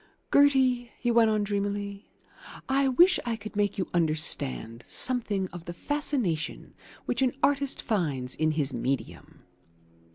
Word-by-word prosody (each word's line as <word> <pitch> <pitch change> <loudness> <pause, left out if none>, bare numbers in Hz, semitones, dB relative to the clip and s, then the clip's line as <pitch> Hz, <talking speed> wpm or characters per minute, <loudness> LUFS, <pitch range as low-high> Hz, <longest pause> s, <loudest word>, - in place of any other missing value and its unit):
Gertie," 260 -4 +4
he 240 - 0
went 230 -1 +4
on 215 -1 +1
dreamily, 200 0 -3 0.6
"I 270 +1 +2
wish 345 +9 +5
I 235 -1 -2
could 215 0 -10
make 205 0 0
you 185 - -2
understand 140 - 0
something 220 -7 0
of 175 -1 -10
the 175 - -7
fascination 250 - -2 0.3
which - - -1
an 255 -2 +2
artist 280 -1 +1
finds 145 - -1
in 155 +1 +1
his 145 -3 0
medium. 130 +3 -4
205 Hz, 135 wpm, -27 LUFS, 160-255 Hz, 0.6 s, wish